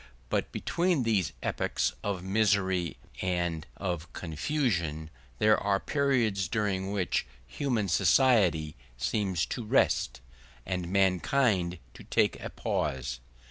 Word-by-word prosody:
But -, -, -1 dB
between 170 Hz, -5 st, 0 dB
these 105 Hz, -6 st, +1 dB
epochs -, -, 0 dB
of 100 Hz, -3 st, -2 dB
misery 95 Hz, -3 st, +1 dB, 0.2 s
and 85 Hz, -3 st, -1 dB
of 90 Hz, -3 st, -3 dB
confusion 85 Hz, -, -1 dB, 0.3 s
there 110 Hz, +8 st, +5 dB
are 100 Hz, -1 st, +1 dB
periods 120 Hz, -10 st, +1 dB
during 95 Hz, -1 st, -1 dB
which 95 Hz, -10 st, 0 dB, 0.2 s
human 110 Hz, -, -1 dB
society 90 Hz, -, +3 dB, 0.2 s
seems 95 Hz, -, 0 dB
to 120 Hz, -, -4 dB
rest, 60 Hz, -, +2 dB, 0.5 s
and 90 Hz, -2 st, -3 dB
mankind 95 Hz, -1 st, +2 dB, 0.2 s
to -, -, -12 dB
make -, -, +3 dB
a -, -, -5 dB
pause. 65 Hz, -3 st, -2 dB
95 Hz, 110 wpm, -29 LUFS, 85-110 Hz, 0.5 s, there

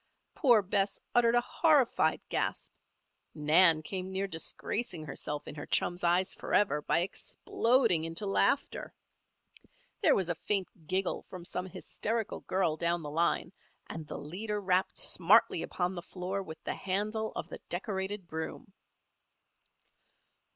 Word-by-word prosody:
_ -, -, -48 dB
Poor 240 Hz, -7 st, +5 dB
Bess 195 Hz, +1 st, 0 dB
uttered 235 Hz, -1 st, +4 dB
a 240 Hz, -, +5 dB
horrified 300 Hz, -7 st, +3 dB
gasp; -, -, -2 dB, 0.6 s
Nan 155 Hz, +1 st, +6 dB
came 185 Hz, +3 st, -4 dB
near 190 Hz, +1 st, -1 dB
disgracing 180 Hz, 0 st, -3 dB
herself 145 Hz, +1 st, -5 dB
in -, -, -6 dB
her 145 Hz, -1 st, -8 dB
chum's 175 Hz, 0 st, 0 dB
eyes 175 Hz, +2 st, +2 dB
forever, 195 Hz, -8 st, +1 dB
by 170 Hz, -, +1 dB
exploding 230 Hz, -, +1 dB
into 165 Hz, +5 st, -4 dB
laughter. 235 Hz, +7 st, 0 dB, 1.1 s
There -, -, +5 dB
was 190 Hz, -3 st, 0 dB
a 175 Hz, -, +1 dB
faint 185 Hz, -2 st, -3 dB
giggle 185 Hz, +2 st, -1 dB
from 180 Hz, -2 st, -8 dB
some 180 Hz, +1 st, -4 dB
hysterical 220 Hz, +4 st, -3 dB
girl 180 Hz, -4 st, +1 dB
down 170 Hz, 0 st, 0 dB
the 145 Hz, -, -6 dB
line 170 Hz, +3 st, 0 dB, 0.3 s
and 160 Hz, -2 st, -7 dB
the 150 Hz, -, -6 dB
leader 205 Hz, +7 st, -4 dB
rapped 185 Hz, -1 st, +1 dB
smartly 185 Hz, -1 st, +4 dB
upon 180 Hz, 0 st, -2 dB
the 175 Hz, -, -5 dB
floor 185 Hz, +2 st, -4 dB
with 160 Hz, -4 st, -10 dB
the -, -, -2 dB
handle 210 Hz, +3 st, -1 dB
of -, -, -5 dB
the -, -, -8 dB
decorated 190 Hz, 0 st, -3 dB
broom. 160 Hz, +4 st, -6 dB
185 Hz, 140 wpm, -31 LUFS, 170-205 Hz, 1.1 s, Nan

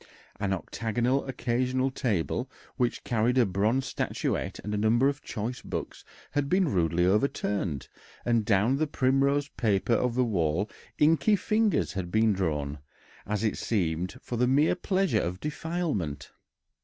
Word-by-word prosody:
An 100 Hz, -1 st, -1 dB
octagonal 115 Hz, -, -1 dB
occasional 130 Hz, +1 st, 0 dB
table, 110 Hz, -11 st, -1 dB, 0.3 s
which 120 Hz, -2 st, -1 dB
carried 120 Hz, +2 st, +1 dB
a 125 Hz, -, +5 dB
bronze 105 Hz, +7 st, +1 dB
statuette -, -, -2 dB
and 105 Hz, -, -4 dB
a -, -, 0 dB
number 115 Hz, +5 st, +3 dB
of 140 Hz, +1 st, -1 dB
choice 115 Hz, +4 st, -4 dB
books, -, -, -5 dB, 0.3 s
had 145 Hz, -1 st, 0 dB
been 185 Hz, -1 st, +3 dB
rudely 85 Hz, -1 st, +2 dB
overturned, 100 Hz, -, 0 dB, 0.4 s
and 115 Hz, -2 st, +2 dB
down 105 Hz, +5 st, +3 dB
the 155 Hz, +1 st, +1 dB
primrose 140 Hz, +1 st, +2 dB
paper 105 Hz, 0 st, +1 dB
of 120 Hz, +1 st, +1 dB
the 125 Hz, 0 st, +3 dB
wall 90 Hz, -3 st, 0 dB, 0.3 s
inky 165 Hz, +8 st, +4 dB
fingers 215 Hz, +1 st, +1 dB
had 95 Hz, -3 st, -3 dB
been 110 Hz, +2 st, +3 dB
drawn, 75 Hz, -6 st, -2 dB, 0.5 s
as 105 Hz, +1 st, -1 dB
it 110 Hz, -, 0 dB
seemed, 90 Hz, -4 st, -1 dB
for 120 Hz, -, -4 dB
the 125 Hz, +1 st, +3 dB
mere 140 Hz, +4 st, +4 dB
pleasure 190 Hz, +1 st, +1 dB
of 90 Hz, +2 st, -3 dB
defilement. 150 Hz, -, -3 dB
115 Hz, 145 wpm, -28 LUFS, 95-135 Hz, 0.5 s, a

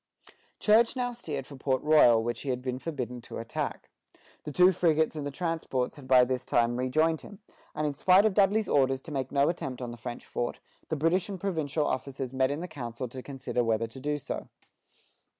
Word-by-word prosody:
Church 225 Hz, +3 st, +4 dB
now 245 Hz, -1 st, -1 dB
steered 165 Hz, -, -5 dB
for 140 Hz, -, -11 dB
Port 130 Hz, -1 st, 0 dB
Royal, 135 Hz, -7 st, +6 dB
which 120 Hz, 0 st, -3 dB
he 140 Hz, -, -5 dB
had 125 Hz, -1 st, -2 dB
been 130 Hz, -1 st, -3 dB
forbidden 125 Hz, -6 st, -5 dB
to -, -, -8 dB
attack. 115 Hz, -, -4 dB, 0.5 s
The 150 Hz, -, -4 dB
two 180 Hz, +5 st, +6 dB
frigates 160 Hz, -3 st, +2 dB
and 145 Hz, -2 st, -3 dB
the -, -, -2 dB
transports 160 Hz, -5 st, -2 dB
had 140 Hz, -4 st, -12 dB
by 125 Hz, -1 st, +6 dB
this 130 Hz, 0 st, -2 dB
time 120 Hz, 0 st, +1 dB
rejoined 155 Hz, +5 st, +1 dB
him, 205 Hz, -, -12 dB, 0.4 s
and 155 Hz, 0 st, -1 dB
in 145 Hz, -, 0 dB
spite 185 Hz, +7 st, +5 dB
of 215 Hz, -, +3 dB
Dudley's 205 Hz, +2 st, +3 dB
orders 135 Hz, -1 st, +2 dB
to 165 Hz, -, -9 dB
make 135 Hz, -2 st, -3 dB
no 140 Hz, 0 st, +3 dB
attempt 135 Hz, -7 st, -3 dB
on 125 Hz, -2 st, -5 dB
the 120 Hz, -, -9 dB
French 120 Hz, +1 st, -7 dB
fort, 120 Hz, -, -3 dB, 0.3 s
the 160 Hz, -, -1 dB
British 165 Hz, +6 st, +1 dB
and 195 Hz, -2 st, -5 dB
provincial 160 Hz, -5 st, -1 dB
officers 130 Hz, -1 st, -3 dB
met 130 Hz, 0 st, +2 dB
in 155 Hz, +5 st, -3 dB
council 125 Hz, -5 st, -5 dB
to 130 Hz, +2 st, -7 dB
consider 130 Hz, -2 st, -3 dB
whether 115 Hz, 0 st, +1 dB
to 115 Hz, +3 st, -10 dB
do 145 Hz, +2 st, -1 dB
so. 145 Hz, -, -5 dB
140 Hz, 205 wpm, -29 LUFS, 125-165 Hz, 0.5 s, Royal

